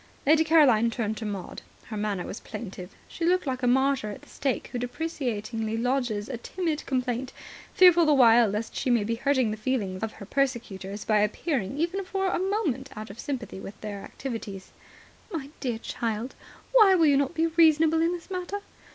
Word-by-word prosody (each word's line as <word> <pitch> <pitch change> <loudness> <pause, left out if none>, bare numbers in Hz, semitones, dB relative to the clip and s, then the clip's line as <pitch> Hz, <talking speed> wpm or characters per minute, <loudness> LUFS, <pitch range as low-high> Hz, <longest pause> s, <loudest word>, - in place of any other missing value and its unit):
Lady 310 +3 +5
Caroline 280 -9 +5
turned 220 -2 -2
to 220 -1 -5
Maud. 195 -3 -6 0.3
Her 220 - -5
manner 205 -3 -2
was - - -6
plaintive. 185 -5 -8 0.2
She 335 - -7
looked 360 +1 +2
like 260 -2 -2
a 250 - +1
martyr 265 -2 +2
at 205 - -8
the - - -17
stake 275 -2 -2
who 245 - -3
deprecatingly 235 -5 -3
lodges 240 -4 -1
a 255 - -4
timid 325 +2 -3
complaint, 255 -1 -2 0.4
fearful 345 -3 +7
the 300 - +5
while 235 -3 +6
lest 210 +3 -4
she - - -1
may 235 -3 +3
be 225 +3 -1
hurting 260 -1 +1
the 215 - -4
feelings 215 -5 -2
of 220 0 -3
her 200 - -10
persecutors 215 -6 -2
by 215 -1 +3
appearing 225 - -1
even 345 +5 -1
for 385 +1 -2
a - - 0
moment 365 - -1
out 215 -1 -6
of 215 - -13
sympathy 250 -8 -5
with 200 +1 -9
their 205 -2 -5
activities. 215 -8 -7 0.6
"My 285 -5 -5
dear 245 -4 -2
child, 230 +1 -3 0.4
why 430 -6 +7
will 335 -3 +4
you 285 -2 +5
not 280 +4 0
be 325 - +2
reasonable 320 -1 +4
in 335 +1 +2
this 350 +1 -7
matter? 370 +2 -4
250 Hz, 190 wpm, -27 LUFS, 215-315 Hz, 0.6 s, fearful